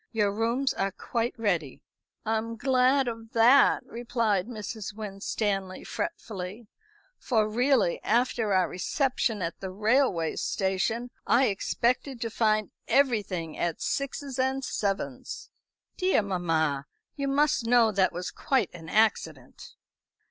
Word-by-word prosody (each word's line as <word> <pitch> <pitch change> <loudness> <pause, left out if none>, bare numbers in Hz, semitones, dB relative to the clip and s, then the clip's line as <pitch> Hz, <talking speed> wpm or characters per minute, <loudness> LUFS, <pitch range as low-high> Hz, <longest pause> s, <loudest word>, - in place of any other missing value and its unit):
Your 210 -3 +1
rooms 235 +5 0
are 195 0 -1
quite 235 +5 -3
ready." 175 - -1 0.4
"I'm 225 +1 -1
glad 260 +2 +3
of 225 -1 -6
that," 240 +5 +5
replied 230 -4 -1
Mrs. 215 -3 -6
Winstanley 195 -2 -3
fretfully; 215 - -5 0.5
"for 220 -4 +1
really 240 -4 +2
after 235 -3 +1
our 185 -2 +3
reception 225 - -1
at 170 0 -4
the 190 - -5
railway 210 - +1
station, 215 +6 -1 0.2
I 255 -1 +4
expected 240 +5 -1
to 230 - -2
find 215 -1 +1 0.2
everything 205 - +1
at 170 -2 -1
sixes 275 -1 -3
and 265 +1 0
sevens." 195 - -3 0.5
"Dear 370 - +2
mamma, 160 -7 0 0.3
you 280 -1 -2
must 275 -4 +2
know 235 -2 +5
that 190 -2 +2
was 180 +1 -5
quite 260 -8 0
an 165 -2 -10
accident." 220 +2 0
220 Hz, 120 wpm, -27 LUFS, 195-250 Hz, 0.5 s, that